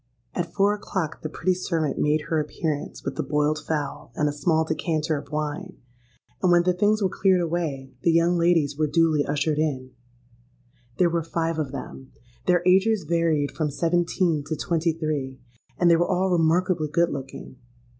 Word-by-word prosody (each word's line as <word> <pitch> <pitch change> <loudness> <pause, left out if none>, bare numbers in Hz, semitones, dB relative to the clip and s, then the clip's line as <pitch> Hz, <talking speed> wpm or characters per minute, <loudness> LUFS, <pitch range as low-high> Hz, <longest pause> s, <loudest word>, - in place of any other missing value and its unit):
"At 170 -2 -3
four 200 +2 +2
o'clock 190 -6 -4
the 155 - -4
pretty 175 +4 0
servant 165 -4 -2
made 150 +1 +2
her 155 +1 -1
appearance 150 0 -3
with 140 - -4
the - - +1
boiled 150 +1 0
fowl 150 -6 -4
and 150 - +1
a - - +1
small 160 +2 +1
decanter 160 -1 -1
of 140 -1 -7
wine; 155 +5 -4 0.6
and 180 - +3
when 175 0 +5
the 180 +1 +2
things 205 +3 +2
were - - +4
cleared 190 0 +2
away, 160 -6 -2
the - - +2
young 170 +2 +3
ladies 170 -4 +2
were 155 +1 +1
duly 155 -1 +2
ushered 150 +1 -1
in. 130 -5 -2 1.1
There 175 -2 +3
were 170 0 0
five 165 0 -2
of 145 -4 -2
them. 135 -1 -8 0.3
Their 175 -1 +3
ages 195 +3 +4
varied 160 -3 +1
from 155 -2 -2
seventeen 170 0 0
to 155 - -2
twenty 165 +2 0
three; 145 -5 -3 0.4
and 175 - +3
they 170 - +6
were 175 - +1
all 185 0 +1
remarkably 170 0 +2
good 170 +3 +1
looking. 135 -1 -7
160 Hz, 175 wpm, -24 LUFS, 150-175 Hz, 1.1 s, they